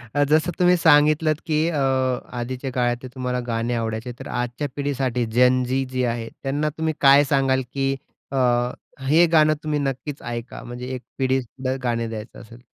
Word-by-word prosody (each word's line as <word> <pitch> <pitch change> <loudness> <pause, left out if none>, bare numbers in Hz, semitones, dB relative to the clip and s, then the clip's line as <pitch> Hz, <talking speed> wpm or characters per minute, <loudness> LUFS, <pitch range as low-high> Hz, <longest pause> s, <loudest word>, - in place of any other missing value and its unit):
अ, 145 - +4
जसं 155 +3 +3
तुम्ही 180 0 +5
सांगितलत, 155 0 +4
की 155 +1 +1
अ, 155 -4 -1 0.6
आधीच्या 130 +2 -4
काळातले 120 0 -1
तुम्हाला 125 -1 -2
गाणे 115 +1 -1
आवडायचे, 115 +1 -3
तर - - -8
आजच्या 125 +4 -3
पिढीसाठी 135 -4 -1
जेन 125 +3 +3
झी 130 +2 0
जी 130 -1 -1
आहे, 115 -1 -2
त्यांना 145 +3 0
तुम्ही 160 0 0
काय 140 +1 +7
सांगाल, 135 -1 +2
की 135 0 0 0.4
अ, 135 - -2 0.7
हे 160 +4 +6
गाणं 155 -1 +5
तुम्ही 150 -1 -1
नक्कीच 140 +1 -3
ऐका 120 0 -6
म्हणजे 120 +1 -7
एक 125 - -7 0.2
पिढीतलं 130 0 -1
गाणे 115 -2 0
द्यायचं 110 0 -8
असेल. 115 +1 -14
130 Hz, 165 wpm, -23 LUFS, 120-145 Hz, 0.7 s, काय